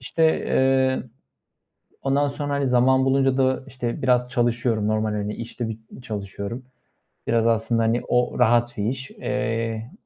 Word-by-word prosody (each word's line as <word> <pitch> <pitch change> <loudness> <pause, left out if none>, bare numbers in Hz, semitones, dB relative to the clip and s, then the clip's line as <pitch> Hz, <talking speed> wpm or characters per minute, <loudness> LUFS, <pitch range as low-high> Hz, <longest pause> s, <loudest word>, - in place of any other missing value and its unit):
İşte, 160 +6 0
eee, 130 0 +2 1.0
ondan 140 +1 +2
sonra, 145 0 -3
hani, 140 -1 0
zaman 130 +1 +4
bulunca 135 0 +2
da 130 0 +2
işte, 120 -2 -4
biraz 125 -1 +2
çalışıyorum, 120 -3 0
normal, 110 0 0
hani, 105 0 -3
işte, 115 0 -5
bit 110 0 -6 0.2
çalışıyorum. 100 +2 -5 0.7
Biraz, 115 0 +2
aslında, 115 0 +1
hani, 115 +2 +1
o 125 0 +1
rahat 120 0 +3
bir 100 - -1
iş. 130 +3 -3
Eee, 115 -1 -3
120 Hz, 145 wpm, -23 LUFS, 115-130 Hz, 1.0 s, zaman